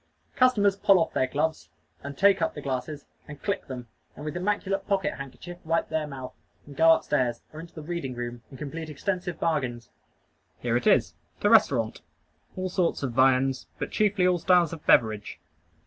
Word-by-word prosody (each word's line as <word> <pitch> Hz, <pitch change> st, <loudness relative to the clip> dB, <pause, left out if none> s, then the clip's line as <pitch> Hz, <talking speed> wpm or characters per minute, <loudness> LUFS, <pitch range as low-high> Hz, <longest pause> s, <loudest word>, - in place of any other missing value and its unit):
Customers 220 Hz, -7 st, +4 dB
pull 195 Hz, -1 st, +4 dB
off 165 Hz, -2 st, 0 dB
their 130 Hz, -, +1 dB
gloves, 155 Hz, +4 st, -2 dB, 0.3 s
and 140 Hz, 0 st, -8 dB
take 195 Hz, -2 st, +4 dB
up 165 Hz, -, 0 dB
the 150 Hz, -, -6 dB
glasses, 140 Hz, +2 st, -4 dB, 0.2 s
and 150 Hz, -1 st, -11 dB
click 200 Hz, -1 st, -2 dB
them, 125 Hz, -3 st, -7 dB, 0.3 s
and 150 Hz, -, -9 dB
with 150 Hz, -, -4 dB
immaculate 195 Hz, +1 st, -1 dB
pocket 200 Hz, 0 st, 0 dB
handkerchief 155 Hz, +6 st, -9 dB
wipe 165 Hz, +1 st, 0 dB
their 155 Hz, -1 st, -1 dB
mouth, 130 Hz, -3 st, -8 dB, 0.3 s
and 145 Hz, -, -12 dB
go 165 Hz, +3 st, +5 dB
up 165 Hz, -, +5 dB
stairs, 125 Hz, -5 st, 0 dB
or 155 Hz, -, -8 dB
into 165 Hz, +1 st, -11 dB
the 155 Hz, -, -8 dB
reading 150 Hz, -6 st, -4 dB
room, 120 Hz, 0 st, -5 dB
and 135 Hz, -, -11 dB
complete 155 Hz, +3 st, -6 dB
extensive 180 Hz, +3 st, -3 dB
bargains. 130 Hz, -8 st, -2 dB, 0.7 s
Here 120 Hz, -1 st, -1 dB
it 120 Hz, -, 0 dB
is 85 Hz, -, +4 dB, 0.3 s
the 205 Hz, -, +3 dB
restaurant. 140 Hz, -, +3 dB, 0.5 s
All 185 Hz, 0 st, -2 dB
sorts 180 Hz, -4 st, 0 dB
of 135 Hz, -, -1 dB
viands, 130 Hz, +1 st, +2 dB
but -, -, -4 dB
chiefly 205 Hz, -3 st, +2 dB
all 180 Hz, -1 st, +2 dB
styles 175 Hz, -2 st, +3 dB
of 160 Hz, -, -8 dB
beverage. 110 Hz, -3 st, +2 dB
155 Hz, 185 wpm, -26 LUFS, 130-180 Hz, 0.7 s, go